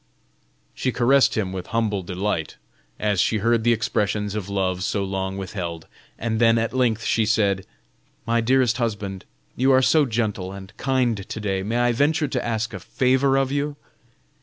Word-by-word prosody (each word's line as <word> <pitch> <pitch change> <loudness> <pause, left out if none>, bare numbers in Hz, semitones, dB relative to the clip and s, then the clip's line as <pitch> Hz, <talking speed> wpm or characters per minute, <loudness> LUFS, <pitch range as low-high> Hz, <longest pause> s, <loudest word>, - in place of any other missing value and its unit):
She 130 - -1
caressed 125 -2 +3
him 95 -3 -1
with 90 -1 -5
humble 110 -4 0
delight, 90 -2 -3 0.4
as 105 -4 +1
she 110 - +1
heard 115 +2 +2
the 120 - +4
expressions 105 -3 0
of 105 -2 -4
love 95 -2 -1
so 100 +1 -1
long 95 0 -3
withheld, 90 -4 -5 0.3
and 110 0 -2
then 115 0 +5
at 115 +1 -1
length 120 -4 +1
she 110 - +2
said: 100 -3 +1 0.6
"My 115 0 +2
dearest 125 0 +2
husband, 105 -5 -3 0.3
you 130 +2 +3
are 130 0 +5
so 150 +1 +4
gentle 105 -5 -2
and 100 +1 -10
kind 125 -7 0
to - - -5
day, 95 -2 -1
may 110 +5 -2
I 120 0 +3
venture 145 +5 +1
to 125 -2 -2
ask 115 -1 -2
a 95 - -5
favor 130 +6 +2
of 135 -1 +1
you? 145 +1 -1
110 Hz, 175 wpm, -23 LUFS, 100-120 Hz, 0.6 s, then